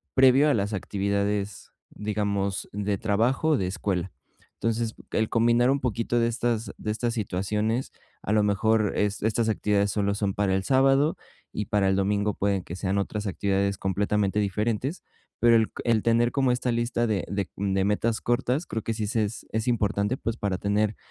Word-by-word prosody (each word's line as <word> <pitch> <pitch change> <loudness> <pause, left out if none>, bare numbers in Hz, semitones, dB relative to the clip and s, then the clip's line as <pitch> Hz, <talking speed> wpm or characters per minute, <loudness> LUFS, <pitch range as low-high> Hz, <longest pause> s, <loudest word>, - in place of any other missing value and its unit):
previo 135 +3 +6
a - - +4
las 105 0 -1
actividades, 100 +1 -2 0.2
digamos, 100 -2 -2
de 100 0 -1
trabajo 115 +10 +1
o 155 - +4
de 95 - -1
escuela. 95 -1 -2 0.5
Entonces, 115 0 -1 0.2
el 110 0 0
combinar 120 +2 +3
un 140 - +1
poquito 120 0 0
de 115 - +2
estas 115 -1 -1
de 105 - -3
estas 115 +2 -1
situaciones, 105 +4 -1 0.3
a 105 - -1
lo 105 -1 +4
mejor 105 +1 +2
es 105 0 0
estas 110 +1 +1
actividades 105 -2 +1
solo 100 0 0
son 100 -1 -1
para 100 -2 +1
el 95 - -1
sábado, 135 +5 +3 0.4
y 105 - -2
para 100 -2 +2
el 95 - +2
domingo 100 +1 +1
pueden 100 -2 0
que 85 - -7
sean 95 +1 -1
otras 105 +1 -3
actividades 100 +1 0
completamente 100 +1 0
diferentes, 105 - -1 0.4
pero 120 0 +5
el 110 -1 +2
el 115 -2 +3
tener 115 +1 +3
como 135 -2 +2
esta 125 0 0
lista 120 0 0
de 105 -5 0
de 100 0 -2
de 95 -1 0
metas 110 +3 0
cortas, 125 +6 0
creo 110 - -4
que 115 - -2
sí 110 -1 -2
se 110 +1 +1
es 105 +3 -7
es 110 +2 -2
importante, 110 0 +1
pues, 115 0 -3
para 100 -4 -1
tener 105 +2 0
105 Hz, 180 wpm, -26 LUFS, 100-115 Hz, 0.5 s, previo